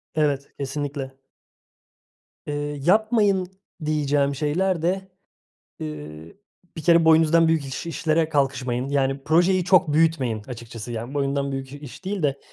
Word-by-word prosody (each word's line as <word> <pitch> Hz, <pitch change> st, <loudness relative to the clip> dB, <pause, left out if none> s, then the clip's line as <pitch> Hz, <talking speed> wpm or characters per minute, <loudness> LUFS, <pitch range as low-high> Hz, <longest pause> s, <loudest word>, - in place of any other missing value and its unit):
Evet, 145 Hz, -3 st, 0 dB
kesinlikle. 140 Hz, -1 st, -4 dB, 1.3 s
Eee, 145 Hz, 0 st, -3 dB
yapmayın 205 Hz, -1 st, +3 dB, 0.4 s
diyeceğim 145 Hz, -2 st, +1 dB
şeyler 165 Hz, +5 st, 0 dB
de, 190 Hz, +2 st, -1 dB, 0.7 s
eee, 75 Hz, +1 st, -8 dB, 0.4 s
bir 160 Hz, -, -4 dB
kere 170 Hz, -1 st, +5 dB
boyunuzdan 160 Hz, +1 st, +5 dB
büyük 160 Hz, -3 st, +1 dB
iş 135 Hz, +4 st, -5 dB
işlere 160 Hz, 0 st, 0 dB
kalkışmayın. 130 Hz, -3 st, 0 dB
Yani, 135 Hz, -1 st, 0 dB
projeyi 175 Hz, +4 st, +3 dB
çok 185 Hz, -4 st, +4 dB
büyütmeyin 150 Hz, -9 st, +2 dB
açıkçası, 115 Hz, -1 st, -8 dB
yani, 120 Hz, +3 st, -5 dB
boyundan 140 Hz, 0 st, -1 dB
büyük 135 Hz, 0 st, -5 dB
iş 145 Hz, +5 st, -11 dB
değil 195 Hz, -4 st, -3 dB
de 140 Hz, -1 st, 0 dB
145 Hz, 125 wpm, -23 LUFS, 135-165 Hz, 1.3 s, kere